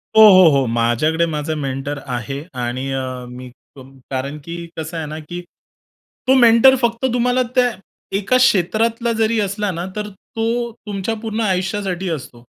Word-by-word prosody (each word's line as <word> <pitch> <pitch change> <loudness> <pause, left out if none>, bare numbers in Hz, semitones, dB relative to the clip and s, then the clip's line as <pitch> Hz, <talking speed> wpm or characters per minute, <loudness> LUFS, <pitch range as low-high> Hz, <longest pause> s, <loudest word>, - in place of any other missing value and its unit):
हो, 220 - +8
हो, 185 -3 +8
हो. 135 - +2
माझ्याकडे 120 +8 +1
माझा 155 -1 -3
मेंटर 140 0 -4
आहे 125 +2 -4 0.2
आणि 130 +3 -3
अ, 130 -1 -4
मी 125 +1 -9 0.3
कारण 135 +2 -6
की 170 0 -6 0.2
कसं 160 +1 -5
आहे 160 - -3
ना, 155 +1 -6
की 175 +3 -7 0.9
तो 260 - +6
मेंटर 240 +1 +7
फक्त 235 +1 0
तुम्हाला 245 +1 +2
त्या 250 -1 +4 0.5
एका 210 +5 +2
क्षेत्रातला 230 0 +2
जरी 225 0 +1
असला 205 0 -1
ना 170 0 -4
तर 210 0 -4
तो 230 +4 -3
तुमच्या 205 +1 -3
पूर्ण 225 0 -3
आयुष्यासाठी 190 -2 -1
असतो. 125 -6 -6
180 Hz, 155 wpm, -19 LUFS, 135-225 Hz, 0.9 s, हो